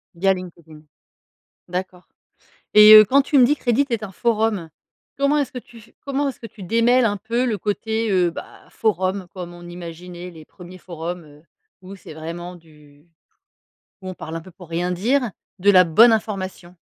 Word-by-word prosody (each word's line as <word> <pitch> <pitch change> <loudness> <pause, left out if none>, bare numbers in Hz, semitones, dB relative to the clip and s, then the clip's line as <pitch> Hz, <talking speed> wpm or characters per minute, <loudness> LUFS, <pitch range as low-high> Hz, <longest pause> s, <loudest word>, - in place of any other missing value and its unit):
Via 190 +3 +2
LinkedIn. 170 -4 -11 0.9
D'accord 180 0 -6 0.7
et 210 0 +9
heu, 215 0 +10
quand 275 +7 +4
tu 280 +1 0
me 250 - +7
dis 290 +4 +2
que - - -24
Reddit 245 +4 +2
est 230 -2 -1
un 200 - -7
forum, 215 -5 -1 0.5
comment 280 +2 +2
est 285 - +1
ce 255 - -20
que 250 - -6
tu 235 -1 -17
f 225 +1 -18
comment 280 0 -2
est - - -3
ce - - -21
que 230 - -9
tu 205 -1 -13
démêle 230 +6 +3
un 205 -2 0
peu 235 +5 -2
le 225 -4 -1
côté, 220 +3 -2
heu, 180 -3 +2
bah, - - -11
forum 190 -3 -1
comme 175 -2 -8
on 175 0 -12
imaginait 175 +1 -9
les 160 -2 -13
1ers 180 +2 -14
forums, 175 0 -7
heu, 150 0 -18 0.4
où 190 +2 -10
c'est 170 -5 -13
vraiment 170 +3 -7
du 150 -3 -20 1.0
où 190 - -8
on 185 - -6
parle 160 -1 -8
un - - -5
peu 185 - -14
pour 180 -1 -15
rien 175 +2 -2
dire, 235 +7 0 0.3
de 200 +3 +4
la 185 -2 +6
bonne 225 +8 +6
information? 190 -5 -4
185 Hz, 200 wpm, -21 LUFS, 175-225 Hz, 1.0 s, heu